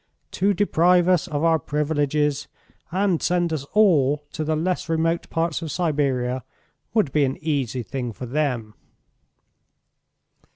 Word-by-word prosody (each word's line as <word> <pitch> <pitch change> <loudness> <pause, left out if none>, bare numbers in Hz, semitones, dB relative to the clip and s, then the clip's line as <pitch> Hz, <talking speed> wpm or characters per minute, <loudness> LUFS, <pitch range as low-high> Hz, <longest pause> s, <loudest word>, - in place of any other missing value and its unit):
To 200 +2 +1
deprive 180 -2 +3
us 180 -1 +3
of 150 -2 -2
our 165 -1 +3
privileges, 145 0 0 0.4
and 190 -2 +1
send 175 -1 +1
us 145 -3 -3
all 150 -9 +3
to 155 - -3
the 155 +1 0
less 175 +2 -2
remote 165 +1 0
parts 165 -1 -1
of 160 -2 -5
Siberia, 135 -6 0 0.5
would 210 -11 +2
be 150 +1 +2
an 135 -1 -1
easy 135 -6 -2
thing 125 +1 -4
for 125 - -8
them." 125 -5 -2
155 Hz, 135 wpm, -23 LUFS, 140-170 Hz, 0.5 s, deprive